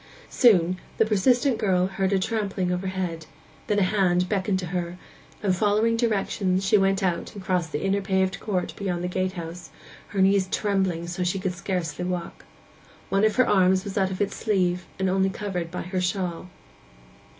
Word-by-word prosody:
Soon 185 -7 +4 0.2
the 225 - +4
persistent 240 +5 +2
girl 185 -4 +2
heard 190 0 -1
a 195 - +3
trampling 195 -2 -1
overhead, 180 -3 -3 0.4
then 210 - +1
a 200 - +4
hand 185 -2 +2
beckoned 195 0 0
to 185 - -4
her, 175 0 -3 0.5
and, 190 -3 +2
following 215 +3 +2
directions, 195 -4 0
she 200 - +4
went 195 0 +2
out 175 0 -1
and 200 - -8
crossed 180 -4 -1
the 150 - -3
inner 195 +1 +1
paved 190 -1 0
court 190 -4 -2
beyond 180 -3 -3
the - - -1
gatehouse, 180 -2 -4 0.4
her 200 - -4
knees 195 0 +3
trembling 190 -5 0
so 175 +2 -5
that 180 - +1
she 180 - 0
could 190 -1 -2
scarcely 180 -2 -3
walk. 180 -1 -4 0.6
One 195 +1 +2
of 215 -1 +3
her 255 - +4
arms 185 -1 +4
was 200 - -6
out 190 -2 +2
of 190 +1 -4
its 205 - 0
sleeve, 180 -4 0
and 190 - 0
only 190 +1 +2
covered 190 -4 -4
by 180 - -5
her 185 +1 -2
shawl. 180 -1 -2
190 Hz, 185 wpm, -25 LUFS, 180-200 Hz, 0.6 s, Soon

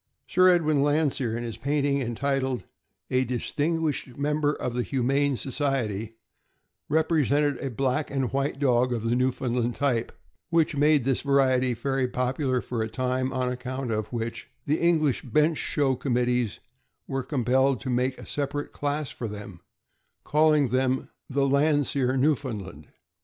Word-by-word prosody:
Sir 185 0 +4
Edwin 155 -5 +3
Landseer, 145 -5 +1
in 120 - -4
his 115 -2 -5
painting 140 0 0
entitled 130 +1 -1 0.5
"A 130 0 +3
Dis 125 -1 -3
tinguished 150 -4 -1
Member 150 +1 +1
of 125 - -4
the 125 - 0
Humane, 135 +2 +1
Society," 120 -6 -2 0.7
represented 150 -3 +2
a 135 - -3
black 135 +4 -1
and 135 -3 -2
white 140 0 0
dog 125 -3 +2
of 115 -2 -3
the 115 +1 +1
Newfoundland 125 -1 0
type, 125 -5 0 0.4
which 165 -2 +2
made 145 -1 +4
this 130 0 0
variety 130 -3 +2
very 135 +2 0
popular 125 +1 -1
for 120 -2 -3
a 110 - -2
time, 130 +1 -1
on 130 -1 -1
account 125 0 -4
of 110 -1 -2
which 115 -1 -4 0.2
the 150 +2 +1
English 160 -5 +2
bench 155 +1 +1
show 140 -3 +1
committees 125 -3 0 0.5
were 135 0 -2
compelled 130 -1 +1
to 130 - -3
make 125 +1 0
a - - -10
separate 145 0 -3
class 145 0 -2
for 115 - -5
them, 100 -4 -8 0.6
calling 150 -3 +3
them 130 +1 0 0.2
the 140 0 +1
Land 145 +1 +3
seer 130 -1 0
Newfoundland. 115 - -1
135 Hz, 150 wpm, -26 LUFS, 125-145 Hz, 0.7 s, Sir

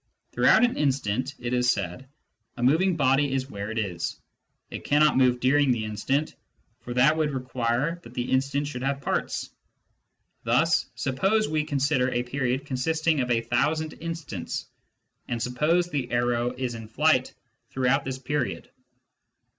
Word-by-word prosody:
Throughout - - +5
an 245 - +2
instant, 130 -2 0
it 120 0 -4
is 125 0 +2
said, 100 +4 -2 0.5
a 120 - -3
moving 165 +8 +3
body 135 -1 +2
is 135 0 -2
where 100 +1 -5
it 110 - -5
is: 90 -6 -3 0.5
it - - -6
cannot 150 +1 +4
move 125 -1 +3
during 140 +3 +3
the 115 -3 +1
instant, 135 +8 -1 0.4
for 120 0 -7
that 135 +5 +5
would 155 -2 +1
require 130 +4 -1
that 120 -3 -14
the 120 0 -3
instant 140 +2 +1
should 145 -4 -5
have 140 +1 -1
parts. - - -2 0.9
Thus, - - +2
suppose 195 +12 +1
we 155 0 0
consider 140 -2 +1
a 120 -1 -1
period 130 +1 -2
consisting 155 +3 0
of 125 - -2
a 115 -1 +2
thousand 150 +7 0
instants, 160 - -5 0.6
and 120 - -2
suppose 150 +9 +1
the 135 -4 -2
arrow 120 0 +1
is 125 -2 -2
in 115 -1 -8
flight 130 +2 +2 0.3
throughout 135 +2 +1
this 130 -1 -4
period. 140 0 -3
130 Hz, 155 wpm, -26 LUFS, 120-145 Hz, 0.9 s, Throughout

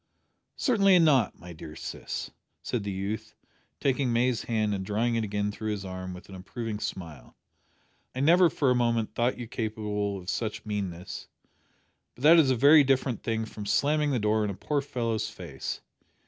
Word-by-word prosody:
"Certainly 195 -7 +4
not, 145 - +4
my 90 0 -10
dear 80 -1 -10
sis," - - -5 0.3
said 120 -4 -2
the 100 - -3
youth, 100 +3 -4 0.4
taking 135 -2 +1
May's 120 0 +1
hand 110 -3 0
and 95 -1 -2
drawing 110 +4 0
it 115 -1 +1
again 105 0 -1
through 110 +1 -5
his 100 -2 -3
arm 95 0 -6
with 90 - -12
an 95 - -12
approving 105 +3 -5
smile. 80 - -6 0.8
"I - - -3
never 170 +4 +6
for 140 -4 +1
a - - +3
moment 115 -3 +1
thought 120 +2 +1
you 120 - -6
capable 105 -3 -2
of 90 -2 -11
such 110 +3 -3
meanness, 95 -4 -4 0.9
but 125 - -12
that 165 +3 +8
is 145 -5 +4
a 130 - +3
very 145 +5 +7
different 130 -3 +1
thing 110 -1 -1
from 105 -1 -8
slamming 150 +7 +2
the 135 - +1
door 110 0 +2
in 105 - -1
a 100 - -4
poor 145 +7 -1
fellow's 115 -5 -2
face. 85 -11 -6
110 Hz, 180 wpm, -28 LUFS, 100-130 Hz, 0.9 s, that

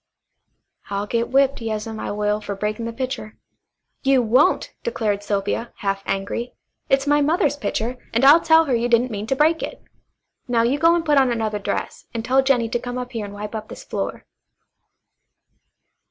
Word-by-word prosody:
"I'll 200 0 -2
get 230 +2 -1
whipped, 275 0 +2
yas'm, 220 0 -4
I - - -4
will, 210 0 -1
fer 205 -1 -5
breaking 210 +3 -3
the 230 - -3
pitcher." 240 -3 -5 0.6
"You 270 -2 +3
won't!" 245 +6 +3
declared 215 - -1
Sylvia, 205 +3 -2
half 195 -1 -2
angrily. 200 +5 -3 0.3
"It's 270 0 +3
my 290 0 +3
mother's 300 0 +2
pitcher, 245 -3 -3
and 235 +4 +2
I'll 300 +4 +8
tell 320 0 +5
her 270 - 0
you 235 0 +1
didn't 240 +1 +3
mean 210 0 -4
to 270 - +1
break 315 +4 +3
it. - - -5 0.7
Now 235 -2 +2
you 260 +5 +1
go 330 +2 +5
and 335 -1 -1
put 295 -2 +4
on 265 -2 +3
another 220 -3 -1
dress, 200 - -4
and 225 0 -3
tell 260 +2 +4
Jennie 255 -4 +2
to 240 - -1
come 245 +1 -5
up 250 0 -5
here 225 -4 -4
and 200 - -9
wipe 210 +1 -6
up 220 -1 -5
this - - -9
floor." - - -4
235 Hz, 185 wpm, -22 LUFS, 215-270 Hz, 0.7 s, I'll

